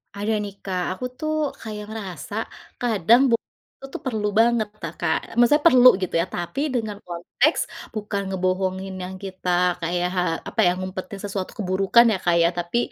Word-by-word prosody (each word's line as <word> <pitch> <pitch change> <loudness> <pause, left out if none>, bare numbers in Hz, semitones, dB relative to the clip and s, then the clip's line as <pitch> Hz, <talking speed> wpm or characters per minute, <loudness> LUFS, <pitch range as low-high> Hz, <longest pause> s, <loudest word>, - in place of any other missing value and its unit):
Ada 205 +2 -2
nih 200 -1 -6
Kak, 185 -2 -2
aku 250 - -5
tuh 310 0 -1 0.3
kayak 210 -1 -6
ngerasa 200 -5 -7 0.5
kadang, 230 +1 +4
bohong 230 - +1 0.3
itu - - -10
tuh - - -5
perlu 220 -5 -1
banget 230 -2 +3
Kakak, 165 +5 -2
maksudnya 290 +5 +5
perlu 255 -4 +7
gitu 185 - -2
ya - - 0
tapi 175 +10 -3
dengan 220 -4 -2
konteks 180 - 0 0.3
bukan 210 -2 -3
ngebohongin 190 +1 -1
yang 185 +1 -6
kita 185 -1 -5 0.3
kayak 175 +1 0
ha 180 - +2 0.3
apa - - -9
ya 175 - +5
ngumpetin 185 +1 -6
sesuatu 195 -2 -4
keburukan 195 +4 +4
ya 210 - +1
Kak 175 -1 +3
ya 170 - +5
tapi, 175 +5 -2
195 Hz, 165 wpm, -23 LUFS, 185-225 Hz, 0.5 s, perlu